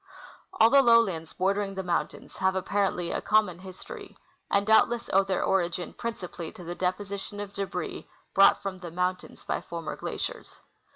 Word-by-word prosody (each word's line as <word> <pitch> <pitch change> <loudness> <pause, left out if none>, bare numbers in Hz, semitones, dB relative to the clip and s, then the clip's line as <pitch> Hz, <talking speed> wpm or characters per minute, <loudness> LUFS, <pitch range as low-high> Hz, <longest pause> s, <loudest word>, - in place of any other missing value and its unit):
All 225 +1 +5
the 280 - +8
lowlands 230 -10 +3
bordering 195 +1 0
the 190 - -3
mountains 175 -1 -3
have, 190 0 +1
apparently, 190 -2 0
a - - -2
common 210 -5 +2
histor}^, 385 - -10 0.3
and 200 0 +2
doubtless 230 +2 +3
owe 195 +1 +6
their 190 -1 -1
origin 175 -2 0
principally 180 -7 -5
to 180 - -11
the 175 +1 -5
deposition 200 +3 -3
of 205 -1 -6
debris 200 -1 -4 0.2
brought 195 0 +6
from 190 -1 -4
the 175 -1 -7
moun 180 +2 0
tains - - -15
by - - -1
former 165 -2 -5
glaciers. - - -5
190 Hz, 165 wpm, -28 LUFS, 180-205 Hz, 0.3 s, the